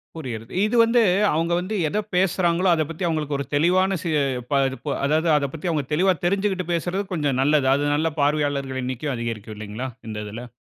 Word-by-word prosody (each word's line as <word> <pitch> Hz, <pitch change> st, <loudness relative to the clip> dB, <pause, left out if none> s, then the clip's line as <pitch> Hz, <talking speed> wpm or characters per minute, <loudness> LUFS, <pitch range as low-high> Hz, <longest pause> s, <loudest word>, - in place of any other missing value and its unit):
புரிகிறது. 120 Hz, -6 st, -6 dB
இது 220 Hz, -, -1 dB
வந்து 230 Hz, +1 st, +3 dB, 0.3 s
அவங்க 165 Hz, +2 st, 0 dB
வந்து 185 Hz, +5 st, -4 dB
எத 210 Hz, -, -1 dB, 0.2 s
பேசுறாங்களோ, 180 Hz, -1 st, +2 dB
அத 160 Hz, -, +2 dB
பத்தி 165 Hz, +3 st, -5 dB
அவங்களுக்கு 150 Hz, -3 st, -1 dB
ஒரு 140 Hz, -, -3 dB
தெளிவான 185 Hz, +5 st, +3 dB
ச -, -, -13 dB, 0.5 s
ப -, -, +1 dB, 0.2 s
த -, -, -5 dB
ப -, -, -8 dB, 0.2 s
அதாவது 155 Hz, +3 st, +2 dB
அத 140 Hz, -, 0 dB
பத்தி 165 Hz, +3 st, -4 dB
அவங்க 150 Hz, -3 st, 0 dB
தெளிவா 185 Hz, +5 st, +3 dB
தெரிஞ்சிகிட்டு 195 Hz, -1 st, 0 dB
பேசுறது 180 Hz, +4 st, -1 dB
கொஞ்சம் 145 Hz, -6 st, 0 dB
நல்லது. 145 Hz, -1 st, +3 dB
அது 145 Hz, -, -1 dB
நல்ல 160 Hz, +2 st, +1 dB
பார்வையாளர்கள் 145 Hz, -2 st, 0 dB
எண்ணிக்கை 130 Hz, +3 st, -3 dB
அதிகரிக்கும் 115 Hz, -2 st, -5 dB
இல்லைங்களா 110 Hz, +5 st, -5 dB, 0.2 s
இந்த 110 Hz, -1 st, -5 dB
இதில? 115 Hz, +4 st, -7 dB
155 Hz, 185 wpm, -23 LUFS, 130-180 Hz, 0.5 s, வந்து